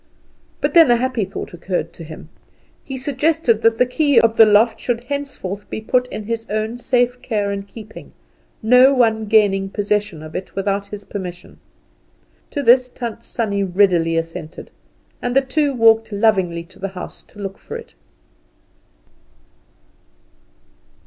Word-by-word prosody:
But - - 0
then 330 -6 +7
a 240 - +6
happy 245 -3 -1
thought 190 - -7
occurred 175 -1 -3
to 165 - -10
him. 155 0 -11 0.5
He 265 - -6
suggested 275 -3 +1
that 225 0 +3
the 250 - +4
key 285 +1 +3
of 230 -1 +2
the 225 -1 +7
loft 215 +2 +4
should 240 -1 -2
henceforth 250 -8 -5
be - - -4
put 250 +3 +1
into 215 -4 -7
his 230 0 -3
own 215 +3 -2
safe 245 0 +1
care 205 -4 -1
and 200 0 -5
keeping 220 +1 -12 0.5
no 250 +4 +6
one 225 -3 +2
gaining 200 -3 +3
possession 205 -5 -2
of 155 0 -10
it 185 - -6
without 200 0 -1
his 205 0 -8
permission. 180 -3 -8 0.9
To 285 - -3
this 250 +1 +5
Tant 235 -2 -6
Sannie 205 -5 -2
readily 175 -3 +2
assented, 165 0 -6 0.5
and 245 0 -2
the 270 - +6
two 285 +2 0
walked 225 -3 +4
lovingly 190 -5 +1
to 170 - -19
the 195 - -3
house - - -8
to - - -21
look 195 -1 -6
for - - -7
it. - - -13
220 Hz, 155 wpm, -19 LUFS, 195-245 Hz, 0.9 s, then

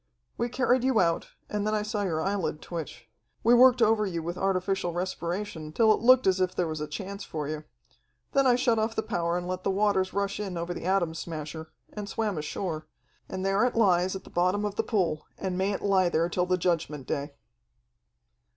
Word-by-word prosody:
"We 240 - -1
carried 250 0 +2
you 260 -4 +3
out, 170 -2 +1 0.2
and 210 0 -2
then 215 - +1
I 210 - 0
saw 210 0 -2
your 165 -5 -1
eyelid 190 -6 -1
twitch. 145 -10 -7 0.4
We 235 - +5
worked 250 0 +7
over 220 -1 +4
you 170 -5 -3
with 170 +2 -3
artificial 190 -1 0
respiration 175 -2 -3
till 220 +5 +5
it - - -2
looked 255 +2 +6
as 190 -1 +3
if 185 0 0
there 180 - +1
was 155 -1 -4
a 150 - -3
chance 195 +6 -6
for 150 -5 -4
you. 155 0 -5 0.7
Then 275 -1 +3
I 245 - +5
shut 245 -3 +2
off 220 +1 -1
the 220 - 0
power 170 0 -1
and 175 0 -4
let 185 0 -3
the - - 0
waters 195 -1 +2
rush 200 0 -1
in 195 -4 -4
over 170 +1 -3
the 170 - -7
Atom 185 -3 +1
Smasher, 160 -1 -6 0.2
and 205 -1 -6
swam 210 -7 -1
ashore. 155 +1 -4 0.4
And 185 0 -4
there 195 +3 +2
it 250 - +1
lies 185 -4 +3
at 190 - -6
the - - -15
bottom 185 +4 +1
of 205 - -2
the - - 0
pool, 170 -8 -1
and 190 -2 -3
may 190 +2 +1
it 200 - -4
lie 190 -3 +3
there 170 0 +1
till 180 +1 0
the 185 0 +2
Judgment 165 -6 -1
Day." 140 +2 -3
185 Hz, 215 wpm, -28 LUFS, 170-210 Hz, 0.7 s, worked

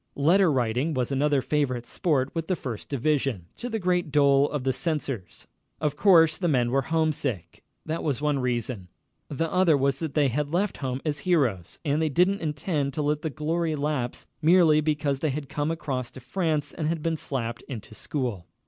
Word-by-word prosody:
Letter 170 +5 +4
writing 130 +4 0
was 125 0 -1
another 140 0 +2
favorite 130 -5 0
sport 140 -6 0
with 165 -1 -3
the 185 - +1
First 120 -9 -6
Division, 135 - 0
to 245 - -5
the 225 - -1
great 180 -5 0
dole 140 -1 +4
of 145 -3 -3
the 130 0 +1
censors. 135 - -3 0.3
Of 150 -2 -1
course 165 -2 +5
the 180 - 0
men 125 -6 +2
were 135 +1 +3
homesick. 150 - -2 0.2
That 160 +1 -2
was 145 -5 0
one 145 -1 +1
reason. 120 -6 -2 0.4
The 160 +3 -2
other 180 -5 +4
was 135 0 +1
that 160 -4 -4
they 145 -3 +3
had 145 +4 -1
left 185 +3 0
home 130 -1 -3
as 150 -2 -1
heroes, 135 - 0
and 150 +1 +1
they 160 - +1
didn't 180 +7 +2
intend 150 -2 -2
to 150 - -1
let 150 +1 0
the 160 - -2
glory 160 +2 -1
lapse 145 -4 -2 0.2
merely 160 -2 +5
because 150 -2 0
they 155 - 0
had 140 0 -4
come 145 +1 -1
across 135 -6 -3
to - - -11
France 155 +3 -1
and 155 0 -2
been 165 -1 0
slapped 120 -6 -3
into 115 -4 -8
school. 115 - -3
150 Hz, 190 wpm, -26 LUFS, 130-160 Hz, 0.4 s, course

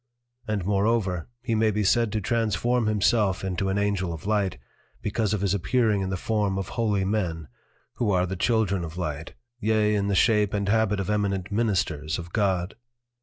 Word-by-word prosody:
And 105 -4 -1
moreover, 100 -3 0
he 120 -2 -1
may 110 0 +3
be 105 0 0
said 115 +3 +2
to 110 - 0
transform 115 +2 +1
himself 105 -2 +2
into 95 0 -1
an 95 - 0
Angel 100 -3 0
of 80 - -9
Light, 100 -3 0 0.5
because 105 0 0
of 105 -3 -1
his 100 -1 +1
appearing 105 +2 +1
in 95 - -2
the 95 - -2
Form 105 -1 0
of 95 - -4
Holy 105 -4 0
Men, 90 -7 -2 0.5
who 115 - 0
are 90 -2 +2
the 95 +1 -4
Children 100 -3 +1
of 80 +1 -7
Light, 80 -3 -4 0.2
yea 110 -1 +2
in 100 -1 0
the 100 - +1
shape 105 +1 +3
and 100 -1 -1
habit 105 -2 +2
of 100 +1 -2
Eminent 100 -3 -1
Ministers 85 -8 0
of 85 0 -8
God. 95 -3 0
100 Hz, 185 wpm, -26 LUFS, 95-110 Hz, 0.5 s, may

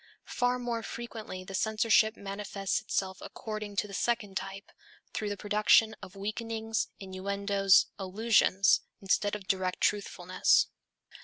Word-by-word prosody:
Far 245 0 0
more 240 -2 -2
frequently 225 -5 -7
the 195 - -9
censorship 220 +2 +3
manifests 195 -1 -3
itself 190 -3 -2
according 215 -2 -6
to 210 - 0
the 200 - -11
second 205 -1 -1
type, 195 +1 -5 0.4
through 210 - -2
the 205 - -3
production 215 +2 +4
of 185 - -11
weakenings, 220 +2 -2
innuendoes, 200 +1 +2
allusions 195 0 +3 0.2
instead 200 +1 +1
of 200 -3 -8
direct 185 -2 0
truthfulness. 185 -3 +2
205 Hz, 125 wpm, -30 LUFS, 195-220 Hz, 0.4 s, production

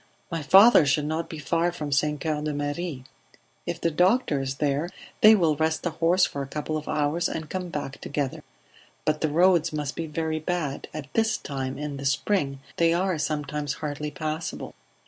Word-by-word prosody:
"My 165 -1 -2
father 195 +6 +7
should 145 +1 +1
not 160 +2 -2
be 160 - -6
far 170 +3 0
from 150 -4 -5
St. 150 +1 +1
Coeur 155 -1 -1
de 150 -1 -2
Marie... 145 -1 -3 0.6
If 175 -1 -3
the 170 - 0
doctor 180 - +2
is 135 0 -3
there 145 +3 0 0.3
they 215 +1 +9
will 165 -6 +2
rest 160 +1 0
the 175 - -1
horse 170 +3 +3
for 140 - -4
a 135 - -4
couple 150 +2 -3
of 155 -1 -4
hours 155 +3 0
and 160 -1 -5
come 185 -1 -3
back 145 -3 -5
together. 145 -2 -3 0.6
But 155 0 0
the 155 - +1
roads 170 +1 +4
must 150 -2 -3
be 165 - -4
very 155 0 -2
bad; 155 -4 -3
at 150 -3 -8
this 225 -1 +2
time, 135 -2 -4
in 145 -1 -4
the 140 - -6
spring, 140 -1 0 0.2
they 165 0 +3
are 185 -2 0
sometimes 150 -1 -2
hardly 150 0 -4
passable." 155 +2 -4
155 Hz, 190 wpm, -26 LUFS, 145-170 Hz, 0.6 s, they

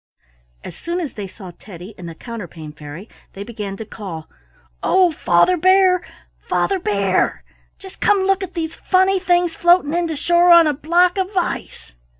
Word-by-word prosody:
As - - -9
soon 340 +1 -4
as 315 -7 -5
they 205 -2 -6
saw 190 -1 -11
Teddy 185 +1 -11
and 175 -2 -9
the 165 - -10
Counterpane 175 -9 -9
Fairy 150 +6 -10 0.3
they 195 - -7
began 205 -3 -7
to 220 - -7
call: 185 -7 -8 0.5
"Oh, 370 -2 +3
Father 305 - +2
Bear! 370 0 +4 0.4
Father 390 -1 -1
Bear! 200 - 0 0.3
Just 385 -1 -14
come 405 -2 +3
look 390 0 +1
at 375 -1 -7
these 325 -1 -3
funny 380 +2 +1
things 350 -2 +1
floating 345 -3 +3
in 345 0 0
to 320 - -4
shore 345 +4 +3
on 340 -1 +8
a 300 - +1
block 350 +6 +2
of 380 0 -1
ice." 350 - -4
325 Hz, 170 wpm, -19 LUFS, -, 0.5 s, on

